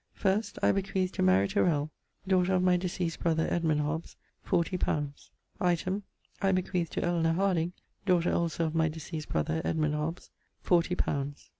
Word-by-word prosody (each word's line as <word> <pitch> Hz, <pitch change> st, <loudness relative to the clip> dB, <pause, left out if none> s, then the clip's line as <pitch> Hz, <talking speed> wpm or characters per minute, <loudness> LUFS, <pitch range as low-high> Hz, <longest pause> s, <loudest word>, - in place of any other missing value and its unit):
First, 200 Hz, +1 st, 0 dB
I -, -, +6 dB
bequeath 195 Hz, -1 st, -1 dB
to -, -, -3 dB
Mary 95 Hz, +2 st, +4 dB
Tirell, 155 Hz, -, +1 dB, 0.4 s
daughter 185 Hz, 0 st, +3 dB
of 180 Hz, -, +2 dB
my 180 Hz, -1 st, +4 dB
deceased 175 Hz, -2 st, -2 dB
brother, 160 Hz, -1 st, +1 dB
Edmund 160 Hz, -3 st, +1 dB
Hobbes, 155 Hz, +3 st, -3 dB, 0.3 s
forty 175 Hz, -1 st, 0 dB
pounds. 145 Hz, -5 st, -2 dB, 0.3 s
Item, 180 Hz, +3 st, 0 dB, 0.4 s
I 195 Hz, -1 st, +3 dB
bequeath 185 Hz, -2 st, 0 dB
to -, -, -1 dB
Elenor 170 Hz, -2 st, +1 dB
Harding, 180 Hz, -2 st, +1 dB, 0.3 s
daughter 175 Hz, -2 st, +3 dB
also 170 Hz, -1 st, 0 dB
of 155 Hz, -, -2 dB
my 160 Hz, -1 st, +2 dB
deceased 155 Hz, 0 st, -6 dB
brother, 80 Hz, +1 st, 0 dB
Edmund 155 Hz, -2 st, 0 dB
Hobbes, 150 Hz, +3 st, -3 dB, 0.3 s
forty 175 Hz, 0 st, +3 dB
pounds. 140 Hz, -3 st, -3 dB
170 Hz, 160 wpm, -30 LUFS, 155-185 Hz, 0.4 s, I